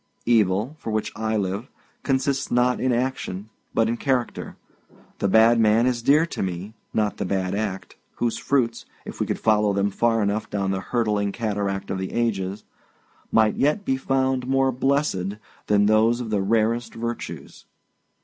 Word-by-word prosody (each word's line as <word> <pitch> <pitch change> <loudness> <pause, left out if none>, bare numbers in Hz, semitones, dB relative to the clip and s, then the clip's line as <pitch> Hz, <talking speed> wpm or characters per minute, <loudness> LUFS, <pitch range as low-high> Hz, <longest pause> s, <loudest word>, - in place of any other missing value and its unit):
Evil, 110 +3 +2
for - - -6
which 110 0 -1
I 110 0 -1
live, 100 +5 -3 0.3
consists 135 0 0
not 125 +1 +2
in 130 - +1
action 120 -5 -2 0.2
but 115 -1 +2
in 115 +1 -1
character. 130 -3 -2 0.6
The - - +1
bad 110 +4 +5
man 110 +1 +4
is 125 -2 0
dear 150 +7 +4
to 170 - -5
me, 95 +3 -4 0.2
not 105 -1 0
the - - -2
bad 95 0 -1
act, 100 -2 -4 0.2
whose 120 -1 -1
fruits, 120 -4 0 0.2
if - - -8
we - - 0
could - - -1
follow 105 -2 +2
them 100 +1 +1
far 115 +1 +1
enough 100 +2 -1
down 100 -1 -1
the 95 - -1
hurtling 105 -1 0
cataract 100 -3 -2
of 95 - -2
the 95 - -4
ages, 100 -4 -1 0.7
might 110 -1 +3
yet 155 +9 +1
be 135 - +1
found 130 -1 0
more 135 0 +2
blessed 130 -7 0 0.3
than 105 -1 +4
those 110 +3 +3
of 115 -3 -5
the 105 -2 +1
rarest 115 +3 0
virtues. 115 +1 -6
110 Hz, 170 wpm, -24 LUFS, 100-125 Hz, 0.7 s, bad